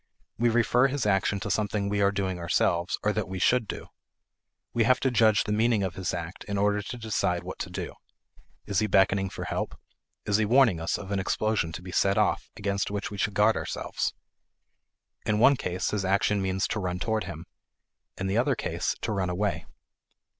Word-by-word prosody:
We 120 0 +4
refer 120 +2 +3
his 135 -2 -2
action 100 0 +2
to 100 - -3
something 105 0 0
we 100 0 0
are 100 0 +4
doing 95 -2 -2
ourselves 85 +1 +1
or 105 - +2
that 110 -2 -2
we 95 0 -5
should 115 +4 +2
do. - - -6 0.9
We 115 - +3
have 130 +3 +4
to 130 - +2
judge 110 -3 +4
the 105 - -4
meaning 110 0 +2
of 95 -2 -2
his 95 -2 -3
act 85 +2 -6
in 100 -1 -3
order 105 +1 +2
to 125 +5 -7
decide 105 -6 -1
what - - -7
to - - -4
do. - - -5 0.7
Is 100 -3 0
he 110 - +1
beckoning 95 -1 +3
for - - -6
help? - - -4 0.5
Is 105 -1 +2
he 110 - +2
warning 115 -5 +4
us 80 - -1
of 100 0 -8
an 100 - 0
explosion 105 -2 0
to 85 - -7
be 90 - -8
set 100 +2 +2
off, 105 -1 +1
against 100 -2 -1
which 100 0 -4
we 100 - -6
should 105 0 0
guard 105 +2 +4
ourselves? - - -3 1.1
In 105 - +1
one 135 +6 +6
case, 90 -7 -2
his 105 -2 -1
action 100 +1 +2
means 95 0 0
to 110 - -1
run 90 -2 -2
toward 110 +3 -1
him; 85 +1 -7 0.7
in 95 - -3
the 95 +4 +1
other 130 +2 +2
case, - - -2
to - - -2
run 95 -3 -1
away. 100 +3 -1
100 Hz, 205 wpm, -27 LUFS, 95-110 Hz, 1.1 s, one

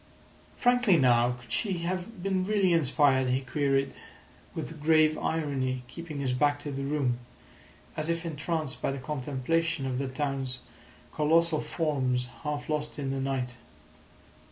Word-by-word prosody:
"Frankly 245 -7 +4
now, 120 -3 +4
could 120 -2 -15
she 195 - 0
have 185 +3 -4
been 190 -1 +1
really 195 -2 +3
inspired?" 140 -4 +3
he 130 +1 +1
queried, 135 0 0 0.6
with 160 -2 -5
grave 155 0 +5
irony, 135 -5 -1
keeping 155 +1 -7
his 130 -2 0
back 145 +3 +3
to 145 - -4
the 135 0 -3
room, 135 -4 0 0.8
as 155 +1 -2
if 170 0 -1
entranced 155 -2 -2
by - - 0
the 135 - -4
contemplation 145 +3 -1
of 130 -1 -1
the 135 - -1
town's 135 -1 -2 0.6
colossal 160 +1 +3
forms 130 -6 0
half 150 -1 -3
lost 150 -1 -2
in 135 -2 -2
the 135 - -2
night. 130 -2 -2
145 Hz, 145 wpm, -29 LUFS, 130-165 Hz, 0.8 s, grave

